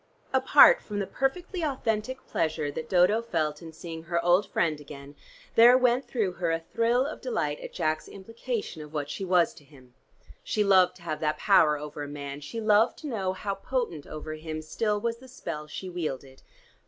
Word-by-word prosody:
Apart 265 Hz, -, +7 dB
from 210 Hz, -, -6 dB
the 200 Hz, -, -1 dB
perfectly 340 Hz, -, -2 dB
authentic 260 Hz, -3 st, -2 dB
pleasure 155 Hz, -2 st, -1 dB
that 160 Hz, -, -6 dB
Dodo 185 Hz, +5 st, +4 dB
felt 155 Hz, -9 st, -2 dB
in 165 Hz, -1 st, -9 dB
seeing 165 Hz, 0 st, -8 dB
her 170 Hz, 0 st, 0 dB
old 180 Hz, +3 st, +3 dB
friend 155 Hz, -3 st, 0 dB
again, 140 Hz, 0 st, -11 dB, 0.4 s
there 240 Hz, +2 st, +8 dB
went 255 Hz, +1 st, +2 dB
through 215 Hz, -7 st, -1 dB
her 175 Hz, -2 st, -2 dB
a 165 Hz, -, 0 dB
thrill 230 Hz, +9 st, +1 dB
of 295 Hz, -, -6 dB
delight -, -, -2 dB
at -, -, -8 dB
Jack's 155 Hz, -, -1 dB
implication 225 Hz, -3 st, -5 dB
of 150 Hz, +1 st, -11 dB
what 145 Hz, -1 st, -3 dB
she -, -, -5 dB
was 180 Hz, -2 st, +3 dB
to -, -, -16 dB
him. 130 Hz, -3 st, -19 dB, 0.5 s
She 210 Hz, -, 0 dB
loved 190 Hz, -3 st, +4 dB
to -, -, -17 dB
have 155 Hz, -3 st, -3 dB
that 155 Hz, -1 st, 0 dB
power 155 Hz, -7 st, +4 dB
over 150 Hz, 0 st, -7 dB
a 145 Hz, -, -4 dB
man; 140 Hz, 0 st, -7 dB
she 185 Hz, +10 st, -6 dB
loved 215 Hz, +1 st, +3 dB
to 310 Hz, -, -8 dB
know 195 Hz, -8 st, -2 dB
how 200 Hz, +1 st, -3 dB
potent 195 Hz, -, -3 dB
over 155 Hz, 0 st, -6 dB
him 155 Hz, 0 st, -6 dB
still 210 Hz, +6 st, -1 dB
was 230 Hz, +2 st, -2 dB
the 260 Hz, +2 st, -15 dB
spell 150 Hz, -10 st, -6 dB
she 185 Hz, +5 st, -7 dB
wielded. 140 Hz, -7 st, -5 dB
180 Hz, 195 wpm, -27 LUFS, 155-230 Hz, 0.5 s, there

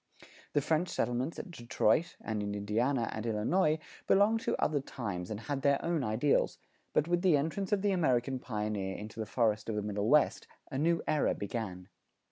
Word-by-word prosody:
The 145 Hz, -, +3 dB
French 160 Hz, +4 st, +1 dB
settlements 125 Hz, +6 st, -1 dB
at 190 Hz, -, -7 dB
Detroit 125 Hz, +3 st, +1 dB
and 110 Hz, -2 st, -2 dB
in 100 Hz, 0 st, -3 dB
Indiana 115 Hz, +5 st, 0 dB
and 110 Hz, -, -4 dB
Illinois 150 Hz, -, +2 dB, 0.3 s
belonged 210 Hz, +3 st, +4 dB
to -, -, -1 dB
other 150 Hz, -1 st, +2 dB
times 100 Hz, -10 st, -5 dB
and 110 Hz, 0 st, -4 dB
had 135 Hz, +4 st, -3 dB
their 140 Hz, 0 st, +3 dB
own 165 Hz, -4 st, 0 dB
ideals; 120 Hz, +6 st, +1 dB, 0.3 s
but 150 Hz, -, +2 dB
with 175 Hz, 0 st, +1 dB
the 180 Hz, -5 st, +5 dB
entrance 165 Hz, +7 st, -2 dB
of 205 Hz, -1 st, +1 dB
the 205 Hz, -, +3 dB
American 130 Hz, -7 st, +1 dB
pioneer 105 Hz, -5 st, -3 dB
into 105 Hz, +1 st, -8 dB
the 110 Hz, -, -3 dB
forest 110 Hz, -2 st, +1 dB
of 110 Hz, -, -1 dB
the 105 Hz, -, -1 dB
Middle 105 Hz, +1 st, -1 dB
West, 150 Hz, +1 st, +3 dB, 0.2 s
a 135 Hz, -, -2 dB
new 165 Hz, +2 st, +2 dB
era 150 Hz, -, +2 dB
began. 100 Hz, -4 st, -5 dB
125 Hz, 185 wpm, -32 LUFS, 105-155 Hz, 0.3 s, the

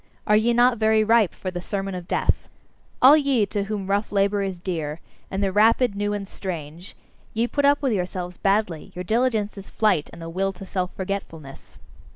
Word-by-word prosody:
Are 210 Hz, -, +4 dB
ye 220 Hz, +3 st, +3 dB
not 240 Hz, 0 st, +3 dB
very 220 Hz, 0 st, +3 dB
ripe 220 Hz, -3 st, +4 dB
for 185 Hz, -, -5 dB
the 175 Hz, -1 st, -5 dB
sermon 195 Hz, +1 st, -4 dB
of 180 Hz, -1 st, -6 dB
death? -, -, 0 dB, 0.5 s
All 270 Hz, +4 st, +10 dB
ye 275 Hz, -7 st, +2 dB
to 200 Hz, 0 st, -3 dB
whom 205 Hz, -2 st, -4 dB
rough 200 Hz, +2 st, -1 dB
labour 200 Hz, 0 st, +2 dB
is 190 Hz, -2 st, -3 dB
dear, 165 Hz, -4 st, -4 dB, 0.3 s
and 195 Hz, +1 st, -2 dB
the 195 Hz, -, +1 dB
rapid, 225 Hz, +3 st, +4 dB
new, 205 Hz, 0 st, -1 dB
and 205 Hz, -1 st, -4 dB
strange 170 Hz, -2 st, -7 dB, 0.4 s
ye 230 Hz, +2 st, +2 dB
put 285 Hz, +3 st, 0 dB
up 285 Hz, +1 st, +3 dB
with 260 Hz, -4 st, +2 dB
yourselves 180 Hz, -2 st, -3 dB
badly; 195 Hz, -5 st, 0 dB
your 180 Hz, -, -4 dB
diligence 220 Hz, -1 st, 0 dB
is 195 Hz, -, -12 dB
flight, 205 Hz, -9 st, +1 dB
and 170 Hz, -, -12 dB
the 165 Hz, -, -7 dB
will 195 Hz, +3 st, -1 dB
to 195 Hz, +1 st, -10 dB
self 185 Hz, -1 st, -2 dB
forgetfulness. 175 Hz, -7 st, -6 dB
200 Hz, 195 wpm, -24 LUFS, 180-220 Hz, 0.5 s, All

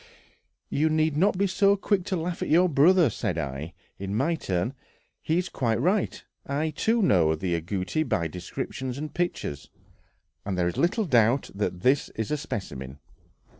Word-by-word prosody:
"You 155 Hz, +3 st, +2 dB
need 155 Hz, -1 st, +1 dB
not 190 Hz, +5 st, +2 dB
be 200 Hz, -, +2 dB
so 200 Hz, +1 st, +3 dB
quick 195 Hz, -2 st, 0 dB
to 190 Hz, -, -1 dB
laugh 170 Hz, 0 st, -3 dB
at -, -, -2 dB
your 175 Hz, +4 st, +5 dB
brother," 170 Hz, +3 st, +5 dB
said 90 Hz, -3 st, -2 dB
I, 75 Hz, +2 st, -4 dB, 0.3 s
in 100 Hz, +1 st, -3 dB
my 165 Hz, +9 st, +1 dB
turn; 95 Hz, -, -2 dB, 0.5 s
"he 160 Hz, -, 0 dB
is 180 Hz, +1 st, 0 dB
quite 115 Hz, -3 st, -1 dB
right. 185 Hz, -, 0 dB, 0.2 s
I, 150 Hz, +3 st, -1 dB
too, 225 Hz, +9 st, +1 dB
know 85 Hz, -, +4 dB
the 85 Hz, +2 st, -2 dB
agouti 90 Hz, -, -2 dB
by 85 Hz, -, 0 dB
descriptions 120 Hz, -, -5 dB
and 150 Hz, +1 st, -5 dB
pictures, 170 Hz, -, -3 dB, 0.7 s
and 95 Hz, -2 st, -3 dB
there 90 Hz, -1 st, +2 dB
is 85 Hz, -, -3 dB
little 210 Hz, +6 st, +2 dB
doubt 120 Hz, -, +3 dB
that 100 Hz, -3 st, -2 dB
this 135 Hz, +6 st, +2 dB
is 110 Hz, +3 st, -3 dB
a 150 Hz, -, +1 dB
specimen. 70 Hz, -, -6 dB
140 Hz, 170 wpm, -26 LUFS, -, 0.7 s, your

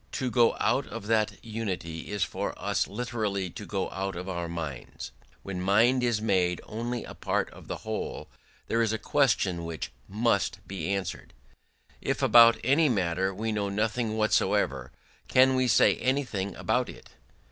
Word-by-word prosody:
To 130 Hz, -2 st, -2 dB
go 120 Hz, -2 st, +4 dB
out -, -, +1 dB
of -, -, -7 dB
that 110 Hz, -1 st, +1 dB
unity 95 Hz, -8 st, -4 dB
is 105 Hz, -1 st, 0 dB
for -, -, -3 dB
us -, -, 0 dB
literally 105 Hz, -5 st, -2 dB
to 105 Hz, -, -8 dB
go 95 Hz, -2 st, -2 dB
out 95 Hz, 0 st, -3 dB
of 90 Hz, +2 st, -6 dB
our 85 Hz, -2 st, -3 dB
minds.... 80 Hz, -7 st, -6 dB, 0.3 s
When 95 Hz, -2 st, -4 dB
mind 115 Hz, +7 st, +4 dB
is 120 Hz, -3 st, +1 dB
made 90 Hz, -5 st, +1 dB
only 120 Hz, +2 st, -4 dB
a -, -, -9 dB
part -, -, -1 dB
of -, -, -14 dB
the -, -, -4 dB
whole, -, -, -4 dB, 0.4 s
there 115 Hz, -, +1 dB
is 115 Hz, -2 st, +2 dB
a 110 Hz, -, 0 dB
question 105 Hz, -10 st, +1 dB
which 85 Hz, -3 st, -5 dB, 0.2 s
must 100 Hz, -3 st, +1 dB
be 95 Hz, -3 st, -4 dB
answered.... 100 Hz, -9 st, -4 dB, 0.7 s
If -, -, -1 dB
about 115 Hz, -1 st, +8 dB
any 145 Hz, +5 st, +4 dB
matter 95 Hz, -3 st, 0 dB
we 110 Hz, +4 st, -3 dB
know 105 Hz, -2 st, -1 dB
nothing 110 Hz, +2 st, -1 dB
whatsoever, 110 Hz, 0 st, +1 dB, 0.4 s
can 130 Hz, +1 st, +5 dB
we 130 Hz, -1 st, +2 dB
say 120 Hz, -, +5 dB
anything 125 Hz, -7 st, -1 dB
about 125 Hz, +3 st, 0 dB
it? -, -, -12 dB
105 Hz, 165 wpm, -28 LUFS, 95-120 Hz, 0.7 s, about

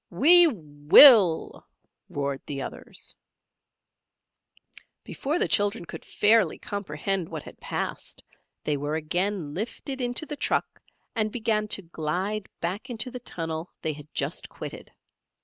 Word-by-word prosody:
"We 335 Hz, -, +7 dB
will!" 170 Hz, -, +5 dB, 0.4 s
roared 140 Hz, -1 st, -3 dB
the 140 Hz, -2 st, -4 dB
others. -, -, -5 dB, 1.9 s
Before 295 Hz, +5 st, -3 dB
the -, -, +1 dB
children 205 Hz, -2 st, 0 dB
could -, -, -9 dB
fairly 210 Hz, -4 st, +2 dB
comprehend 195 Hz, -1 st, -3 dB
what 160 Hz, -3 st, -6 dB
had -, -, -13 dB
passed, -, -, -5 dB, 0.4 s
they 150 Hz, -1 st, -1 dB
were 145 Hz, +2 st, -3 dB
again 175 Hz, 0 st, -2 dB
lifted 245 Hz, -, -5 dB
into 245 Hz, +5 st, -2 dB
the 300 Hz, -, -6 dB
truck -, -, -2 dB, 0.3 s
and 215 Hz, -2 st, 0 dB
began 215 Hz, -2 st, 0 dB
to 200 Hz, -1 st, -1 dB
glide 180 Hz, +6 st, -3 dB
back 195 Hz, +9 st, -4 dB
into 240 Hz, +1 st, -4 dB
the 250 Hz, -, -7 dB
tunnel 165 Hz, -6 st, -5 dB
they 160 Hz, -2 st, -1 dB
had 150 Hz, 0 st, -13 dB
just -, -, -4 dB
quitted. -, -, -9 dB
195 Hz, 130 wpm, -26 LUFS, 155-230 Hz, 1.9 s, We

